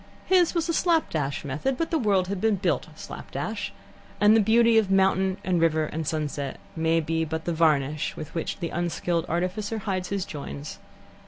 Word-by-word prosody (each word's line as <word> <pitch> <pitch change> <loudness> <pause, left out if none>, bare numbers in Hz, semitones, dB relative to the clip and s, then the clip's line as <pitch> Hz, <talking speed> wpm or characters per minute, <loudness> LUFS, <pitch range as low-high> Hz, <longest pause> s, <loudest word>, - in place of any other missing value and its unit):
His 360 -2 +3
was 335 -1 +1
a 335 - 0
slap 330 -1 +2
dash 145 -2 -2
method, 155 - -1
but 330 - -2
the 325 - +2
world 200 -6 +2
has 200 -1 -2
been 220 +1 +2
built 195 - 0
slap - - -9
dash, - - -4 0.5
and 210 +2 +6
the 225 - +5
beauty 225 +2 +5
of 210 -3 -1
mountain 190 0 +3
and 180 -3 +1
river 160 -1 +3
and 155 0 -4
sunset 145 -3 -3 0.2
may 165 0 +2
be 160 +1 -1
but 160 0 -4
the 170 - 0
varnish 155 -2 +1
with 155 +1 -7
which 165 - -3
the 170 -3 -4
unskilled 175 0 -1
artificer 185 +6 -1
hides 190 -4 -3
his 200 -2 -1
joins. 145 0 -7
180 Hz, 190 wpm, -26 LUFS, 160-215 Hz, 0.5 s, and